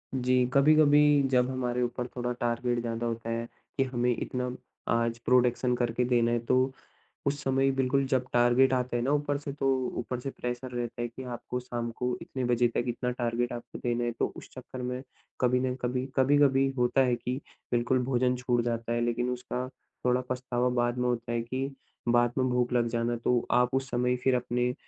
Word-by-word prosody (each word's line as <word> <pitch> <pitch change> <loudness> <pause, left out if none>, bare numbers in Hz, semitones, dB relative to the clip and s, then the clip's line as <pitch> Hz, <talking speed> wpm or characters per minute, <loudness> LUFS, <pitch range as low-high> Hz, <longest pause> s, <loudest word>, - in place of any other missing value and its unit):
जी 125 0 +3
कभी-कभी 145 +1 +6 0.3
जब 125 -1 +3
हमारे 125 -1 -1
ऊपर 120 0 -2
थोड़ा 125 0 -2
टारगेट 120 0 0
ज़्यादा 115 0 -3
होता 115 0 -3
है 115 0 -2 0.3
कि 135 - +4
हमें 125 -2 0
इतना 125 0 -3 0.4
आज 115 0 +1
प्रोडक्शन 125 0 +3
करके 120 0 0
देना 120 -1 +2
है 120 - +2
तो 125 - +3 0.7
उस 140 0 0
समय 135 0 +2
बिल्कुल 135 +1 +2
जब 130 -2 +1
टारगेट 120 +2 +4
आता 125 -1 0
है 120 - 0
ना 135 - 0
ऊपर 145 -1 +1
से, 140 -1 -6
तो 135 - -2 0.3
ऊपर 125 +1 -3
से 135 +2 -4
प्रेशर 125 +1 -5
रहता 120 -1 -4
है 120 - -1
कि 125 +3 -9
आपको 125 0 -5
शाम 120 -1 -4
को 125 0 -1
इतने 130 -1 -4
बजे 120 0 +3
तक 120 - +1
इतना 125 +1 -1
टारगेट 120 0 -1
आपको 120 0 -7
देना 120 0 -1
है। 120 - -1
तो - - +2
उस - - -10
चक्कर 130 - -8
में 125 +1 -3 0.4
कभी 125 0 +3
ना 130 0 0
कभी 125 +1 -1
कभी-कभी 135 0 +4
होता 125 +2 +3
है 125 -1 +2
कि 125 +2 -3 0.4
बिल्कुल 120 +2 +2
भोजन 125 0 +1
छूट 125 -1 +1
जाता 115 -1 -2
है। 120 - 0
लेकिन 120 +1 0
उसका 125 0 -3 0.4
थोड़ा 125 0 +3
पछतावा 125 -1 0
बाद 120 0 0
में 125 0 +1
होता 120 -1 -2
है 115 - 0
कि 130 +3 -3 0.4
बाद 120 0 +4
में 130 0 +2
भूख 125 0 +1
लग 120 -1 +2
जाना 120 +1 -1
तो 125 -1 +2
आप 125 +1 +3
उस 135 +1 -1
समय 125 +1 +1
फिर 130 -1 +4
अपने 125 0 0
अ, 125 - -4
125 Hz, 205 wpm, -29 LUFS, 120-130 Hz, 0.7 s, कभी-कभी